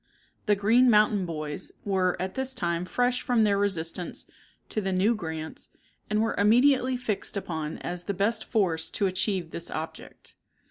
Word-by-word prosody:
The 205 - +5
"Green 230 +6 +4
Mountain 210 -3 +4
Boys" 155 -2 -5
were 190 -3 +1
at 185 +1 -3
this 265 0 -2
time 170 -5 -1
fresh 245 +5 +1
from 240 -3 +2
their 200 -2 +3
resistance 180 -3 -2 0.4
to 215 - -1
the 190 -1 -1
new 190 +5 +3
grants, 160 -6 -6 0.4
and 215 +1 +2
were 225 - 0
immediately 255 +4 +4
fixed 220 -4 -2
upon 160 -5 -4
as 175 0 -5
the 200 - -2
best 215 +4 0
force 175 -8 0
to 205 - -1
achieve 185 -2 -1
this 170 - -5
object. 160 +1 -7
200 Hz, 165 wpm, -27 LUFS, 175-225 Hz, 0.4 s, The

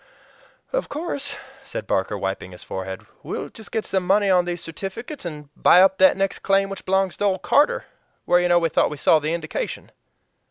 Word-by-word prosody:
"Of - - -1
course," 285 -2 -4 0.3
said 275 - -6
Barker, 95 +2 -1
wiping 95 -1 -4
his 90 - -11
forehead, 95 0 -6 0.2
"we'll - - -5
just 220 - -13
get 220 - -2
some 190 - 0
money 195 +2 +3
on 180 -1 +4
these 175 -1 -4
certificates 195 - -7
and 150 -4 -7
buy 180 - +6
up 190 +1 +5
that 285 -6 +6
next 195 0 -1
claim 195 0 +2
which 195 - -8
belongs 190 -1 +1
to 205 - 0
old 190 -2 0
Carter 290 - +3 0.4
where 175 - +4
you 175 - +2
know 175 0 +4
we 165 -1 +2
thought - - +2
we 150 - -6
saw 155 +3 +4
the 155 +2 -1
indication." 160 -2 -5
185 Hz, 200 wpm, -23 LUFS, 160-200 Hz, 0.4 s, buy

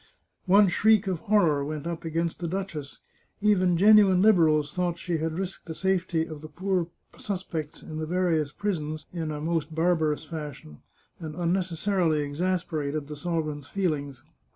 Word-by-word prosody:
One 200 +2 +6
shriek 215 +3 +4
of 185 -4 -1
horror 170 -9 +2
went 150 +1 -5
up 170 -1 -4
against 165 +1 -2
the 175 - -3
duchess; 165 -6 -5 0.4
even 185 -4 +3
genuine 200 -1 +6
Liberals 160 -7 +4
thought 175 -2 -1
she 170 -2 -2
had 160 +1 -2
risked 190 -1 -5
the 160 - -5
safety 185 -3 0
of 155 -3 -9
the 155 - -8
poor 185 +1 -1 0.3
suspects 175 -6 -5
in 155 - -7
the 155 - -3
various 165 -4 +1
prisons 155 -5 -3
in 165 -3 -3
a 150 -1 -4
most 160 0 -2
barbarous 160 -3 +1
fashion, 145 - -8 0.4
and 155 -2 -6
unnecessarily 175 -1 0
exasperated 155 -2 -2
the 150 +1 -7
sovereign's 155 -3 -3
feelings. 145 -9 -2
165 Hz, 150 wpm, -27 LUFS, 155-185 Hz, 0.4 s, One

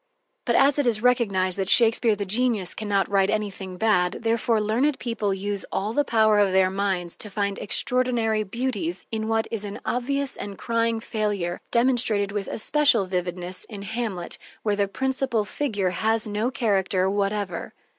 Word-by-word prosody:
But - - +1
as 280 +1 +4
it 285 - +1
is 225 -2 0
recognized 200 -7 +2
that 190 0 0
Shakespeare 230 -1 +5
the 200 0 -4
genius 215 -2 0
can 215 -1 -6
not 200 -1 +2
write 195 -1 +2
anything 195 -3 -3
bad, 180 -3 +2
therefore 230 0 +1
learned 240 +7 +1
people 230 -4 -2
use 200 +1 -2
all 205 +3 -2
the 290 - +2
powers 215 -4 +3
of 190 - -3
their 190 0 +4
minds 190 -3 -2
to 210 - -6
find 200 0 -2
extraordinary 235 -1 +1
beauties 210 -5 -3
in 220 -1 -2
what 225 0 0
is 225 -3 -3
an 205 -1 -6
obvious 275 +2 -1
and 200 -1 -7
crying 230 -1 0
failure, 205 -6 -2
demonstrated 235 -5 +2
with 205 -1 -3
especial 260 -3 +2
vividness 180 0 -3
in 205 -3 -8
"Hamlet," 210 -5 -4 0.2
where 210 -2 +1
the 200 0 +1
principal 260 -1 -1
figure 205 -7 -1
has 220 +4 +1
no 215 +3 -1
character 195 -7 +1
whatever. 200 -2 -2
210 Hz, 165 wpm, -24 LUFS, 195-230 Hz, 0.2 s, Shakespeare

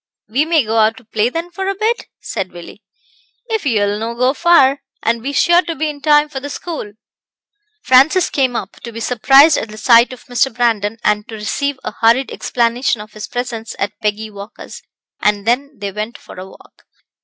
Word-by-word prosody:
"We 260 +8 +1
may 320 -5 +2
go 220 +1 -1
out 220 +1 +3
to 255 - -14
play 220 +1 0
then 335 +5 -5
for 385 +2 -4
a 390 - -1
bit?" 445 +4 -1
said 195 -4 -5
Willie. 175 +4 -12 0.7
"If 440 -9 -1
ye'll 205 -4 +1
no 230 +1 -4
go 255 +2 +2
far, 280 -4 +4 0.2
and 230 0 0
be 275 +4 -3
sure 345 +4 +4
to 335 -2 -5
be 310 +1 -1
in 285 -1 -13
time 295 +1 +4
for 290 -3 -6
the 285 +2 -7
school." 295 -9 -6 0.9
Francis 280 +7 +4
came 260 -3 +1
up, 195 - -5
to 235 - -8
be 230 - -7
surprised 270 +6 +5
at 225 - -6
the 215 - -10
sight 235 +2 +5
of 255 - -11
Mr. 250 +2 +1
Brandon, 225 -3 0
and 210 0 +1
to 225 - -8
receive 265 +6 -2
a - - -4
hurried 235 +4 +3
explanation 240 0 0
of 210 0 -11
his 215 0 -7
presence 245 -2 -5
at 200 +1 -2
Peggy 215 0 -2
Walker's, 200 +1 -10 0.4
and 205 -1 +1
then 275 +4 0
they 200 -1 -5
went 215 +4 -5
for - - -14
a 185 - -8
walk. - - -19
240 Hz, 200 wpm, -17 LUFS, 215-285 Hz, 0.9 s, surprised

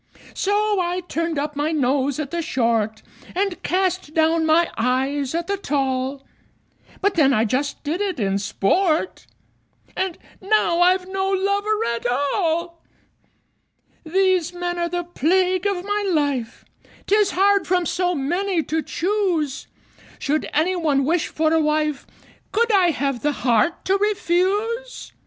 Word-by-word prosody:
So 415 0 +1
I 355 +1 -1
turned 335 -2 -3
up 295 +1 -2
my 295 +2 -1
nose 280 -1 0
at 290 -3 -4
the 340 0 -1
short, 230 -8 0 0.3
And 385 -1 -1
cast 370 -4 -1
down 320 0 +2
my 330 +2 +3
eyes 265 +4 0
at 340 0 -1
the 400 +2 -2
tall; 270 -4 -2 0.8
But 405 0 +2
then 275 -5 +4
I 220 -1 +2
just 270 +6 -2
did 315 +6 -2
it 385 -7 -2
in 195 -2 0
sport 310 - 0 0.7
And 375 -3 -2 0.2
now 390 -4 +2
I've 365 +1 +3
no 385 0 -1
lover 400 +3 0
at 235 +1 -3
all! 330 +6 -1 1.2
These 365 0 +1
men 350 0 -3
are 345 0 -1
the 350 0 -2
plague 365 +3 +1
of 380 -2 -2
my 410 -1 -1
life: 285 -7 -1 0.4
'Tis 410 -1 +2
hard 400 +1 +3
from 360 -1 +1
so 360 +1 0
many 345 +5 0
to 320 +2 -1
choose! 350 -7 -1 0.5
Should 300 +2 -1
any 340 +5 +1
one 295 -6 +1
wish 330 +3 +1
for 315 0 0
a 325 - +3
wife, 305 -2 0 0.4
Could 465 +1 +2
I 380 -4 +4
have 275 -6 -1
the 295 0 +1
heart 245 +8 +2
to 385 +1 +2
refuse? 415 +5 -1
340 Hz, 145 wpm, -22 LUFS, 285-380 Hz, 1.2 s, then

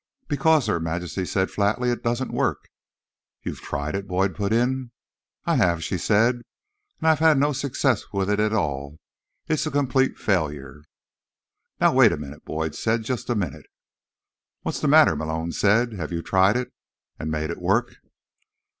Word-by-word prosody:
"Because," 150 0 +3
Her 105 -6 0
Majesty 85 +3 -3
said 95 +1 -1
flatly, 110 +5 +1
"it 120 - -3
doesn't 120 +2 -2
work." - - -1 0.7
"You've - - -5
tried 70 +2 -4
it?" 100 0 -4
Boyd 95 +1 0
put 100 0 -2
in. 125 +2 +1 0.6
"I - - +2
have," 85 -2 +2
she 90 +2 -2
said. 115 +6 +3 0.6
"And - - -12
I - - +6
have 155 - +1
had 160 -2 +5
no 145 +2 +2
success 130 -3 0
with 100 -1 -1
it 105 0 +1
at 105 0 +2
all. 70 -8 -2 0.5
It's 155 0 0
a - - 0
complete 135 -2 +1
failure." 75 -7 -2 1.0
"Now, - - +4
wait - - +6
a - - -2
minute," 75 +1 -9
Boyd 80 -1 -3
said. 110 0 -1
"Just 120 0 -4
a 120 - +1
minute." 80 -8 -4 1.0
"What's - - -3
the - - 0
matter?" - - +6
Malone 80 +1 -3
said. 115 +6 +2
"Have 85 -6 -5
you 85 -1 -3
tried 95 +4 +3
it, 125 - -4 0.5
and 80 - -4
made 80 +1 -2
it 85 - -7
work?" 110 +7 0
100 Hz, 170 wpm, -24 LUFS, 80-125 Hz, 1.0 s, I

